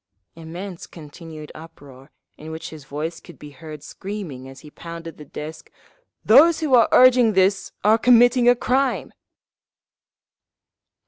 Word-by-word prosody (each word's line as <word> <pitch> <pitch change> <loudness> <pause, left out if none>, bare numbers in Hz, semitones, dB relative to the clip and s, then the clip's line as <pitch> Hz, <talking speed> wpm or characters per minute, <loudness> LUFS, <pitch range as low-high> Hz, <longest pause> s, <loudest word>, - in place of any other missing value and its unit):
Immense 170 +3 -9
continued 155 -1 -12
uproar, 145 -4 -15 0.3
in 155 - -11
which 160 0 -8
his 155 -3 -12
voice 155 +4 -6
could - - -16
be 150 -1 -12
heard 155 0 -11
screaming, 175 -11 -8
as 135 - -14
he 150 - -14
pounded 165 0 -10
the 150 - -11
desk, 155 +2 -9 0.6
"Those 300 +9 +6
who 305 -5 -2
are 235 -2 +5
urging 250 -3 +5
this 190 +1 +1
are 215 +3 +4
committing 245 +1 +4
a 245 - +5
crime!" 255 +2 -1
165 Hz, 135 wpm, -21 LUFS, 155-230 Hz, 0.6 s, Those